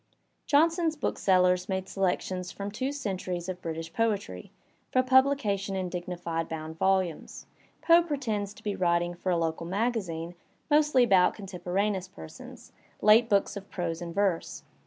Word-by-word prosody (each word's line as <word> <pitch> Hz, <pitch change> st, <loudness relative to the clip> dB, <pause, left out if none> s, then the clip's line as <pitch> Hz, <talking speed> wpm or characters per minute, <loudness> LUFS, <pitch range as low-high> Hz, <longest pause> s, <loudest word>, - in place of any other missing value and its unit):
Johnson's 325 Hz, +2 st, +3 dB
booksellers 180 Hz, -8 st, +2 dB
make 190 Hz, 0 st, -2 dB
selections 185 Hz, -1 st, -2 dB
from 200 Hz, 0 st, -6 dB
two 260 Hz, +6 st, -2 dB
centuries 185 Hz, -9 st, -4 dB
of 185 Hz, -1 st, -5 dB
British 165 Hz, 0 st, -5 dB
poetry, 200 Hz, -, -2 dB, 0.4 s
for 255 Hz, -, +3 dB
publication 255 Hz, -7 st, +2 dB
ia 190 Hz, -, -1 dB
dignified 175 Hz, -2 st, -4 dB
bound 160 Hz, 0 st, -6 dB
volumes. 190 Hz, -4 st, 0 dB, 0.4 s
Foe 335 Hz, 0 st, +7 dB
pretends 225 Hz, -, -3 dB
to 215 Hz, -, -16 dB
be 205 Hz, -2 st, -2 dB
writing 175 Hz, -1 st, +1 dB
for 180 Hz, +1 st, -3 dB
a 175 Hz, -, +2 dB
local 165 Hz, 0 st, -2 dB
magazine 185 Hz, -5 st, -2 dB, 0.4 s
mostly 295 Hz, -4 st, +4 dB
about 190 Hz, -6 st, +4 dB
contemporaneous 190 Hz, 0 st, -2 dB
persons, 80 Hz, -, -12 dB, 0.3 s
late 220 Hz, +3 st, +5 dB
books 200 Hz, 0 st, +2 dB
of 200 Hz, 0 st, -8 dB
prose 170 Hz, -2 st, -3 dB
and 170 Hz, -1 st, -6 dB
verse. 195 Hz, -4 st, -1 dB
190 Hz, 140 wpm, -28 LUFS, 175-225 Hz, 0.4 s, Foe